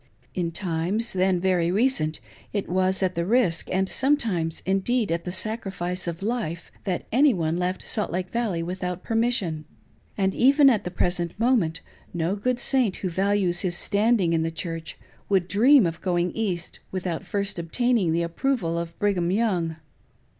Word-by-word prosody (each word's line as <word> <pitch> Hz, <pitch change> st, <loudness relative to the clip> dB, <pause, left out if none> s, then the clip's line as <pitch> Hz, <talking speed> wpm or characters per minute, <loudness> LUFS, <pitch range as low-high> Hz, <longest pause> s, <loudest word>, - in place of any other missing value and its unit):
In 175 Hz, -2 st, -2 dB
times, 185 Hz, +5 st, -1 dB
then 185 Hz, -1 st, +2 dB
very 175 Hz, -2 st, +1 dB
recent, 190 Hz, -7 st, +1 dB, 0.3 s
it 205 Hz, -2 st, -2 dB
was 185 Hz, +1 st, +1 dB
at 185 Hz, -1 st, +1 dB
the 170 Hz, -, -1 dB
risk, 195 Hz, -4 st, +2 dB
and 190 Hz, +1 st, +1 dB
sometimes, 215 Hz, -, 0 dB
indeed, 195 Hz, +3 st, +1 dB
at 170 Hz, 0 st, -2 dB
the 180 Hz, -, -3 dB
sacri 215 Hz, +3 st, -3 dB
fice, 180 Hz, 0 st, -3 dB
of 170 Hz, +2 st, -4 dB
life, 205 Hz, -7 st, -3 dB
that 185 Hz, -3 st, -2 dB
any 265 Hz, +1 st, +4 dB
one 165 Hz, -2 st, -1 dB
left 180 Hz, +1 st, -2 dB
Salt 210 Hz, -, -1 dB
Lake 180 Hz, +2 st, -3 dB
Valley 215 Hz, -8 st, -1 dB
without 180 Hz, 0 st, -4 dB
permis 230 Hz, +2 st, +1 dB
sion; 160 Hz, -9 st, -2 dB, 0.5 s
and 190 Hz, -1 st, +1 dB
even 275 Hz, +2 st, +6 dB
at 215 Hz, -7 st, 0 dB
the -, -, -2 dB
present 175 Hz, 0 st, -1 dB
moment 220 Hz, -10 st, +2 dB, 0.3 s
no 170 Hz, +3 st, 0 dB
good 245 Hz, +4 st, -1 dB
Saint 250 Hz, -7 st, +2 dB
who 185 Hz, -, -3 dB
values 190 Hz, -1 st, +1 dB
his 175 Hz, -3 st, 0 dB
standing 205 Hz, -4 st, +2 dB
in 165 Hz, -, +2 dB
the 165 Hz, -, 0 dB
Church 165 Hz, 0 st, -5 dB, 0.3 s
would 190 Hz, -3 st, +2 dB
dream 245 Hz, +5 st, +5 dB
of 165 Hz, -1 st, -3 dB
going 175 Hz, -1 st, 0 dB
East 185 Hz, -6 st, -3 dB
without 180 Hz, -3 st, -3 dB
first 200 Hz, -3 st, -3 dB
obtaining 210 Hz, +2 st, +1 dB
the 170 Hz, +1 st, +1 dB
approval 170 Hz, -1 st, -1 dB
of 170 Hz, 0 st, -6 dB
Brigham 190 Hz, -4 st, +1 dB
Young. 185 Hz, -6 st, 0 dB
185 Hz, 170 wpm, -25 LUFS, 170-220 Hz, 0.5 s, even